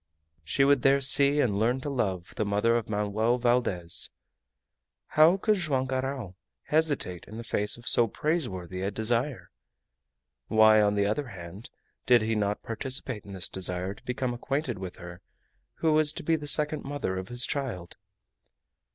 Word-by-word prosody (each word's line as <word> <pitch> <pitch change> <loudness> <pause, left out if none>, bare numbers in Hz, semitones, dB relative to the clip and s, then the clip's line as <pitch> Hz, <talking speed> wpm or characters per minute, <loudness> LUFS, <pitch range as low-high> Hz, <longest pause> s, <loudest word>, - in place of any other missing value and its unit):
She 135 - +1
would 140 -2 +3
there 135 +1 +4
see 140 +1 +7
and 100 -6 0
learn 120 +4 +1
to 145 - -5
love 95 -9 -3
the - - -1
mother 105 +3 +1
of 115 -2 -2
Manoel 105 +3 0
Valdez. 120 -9 0 1.0
How 160 +5 +5
could 210 +1 +1
Joam 140 -7 -1
Garral 130 -6 -4 0.3
hesitate 150 - 0
in 110 - -10
the 115 - -6
face 105 -2 0
of 120 - -14
so 120 - +4
praiseworthy 95 - -3
a 95 - -1
desire? 115 +6 -2 1.0
Why, 110 -1 +5
on 105 0 +2
the 100 0 +1
other 120 +8 -2
hand, 95 +1 -10 0.4
did 120 -3 +5
he 110 +1 -1
not 105 -1 -2
participate 125 -1 -3
in 100 - -10
this 95 0 -2
desire 90 0 -4
to - - -19
become 125 0 -3
acquainted 130 -2 -3
with 95 -2 -7
her 90 +1 -11 0.5
who 160 -1 +1
was 155 -1 +3
to - - -7
be 165 +2 +1
the 150 -2 -6
second 150 +1 +2
mother 140 -9 -4
of 95 - -7
his 120 0 +1
child? 115 -12 -5
120 Hz, 170 wpm, -27 LUFS, 100-140 Hz, 1.0 s, see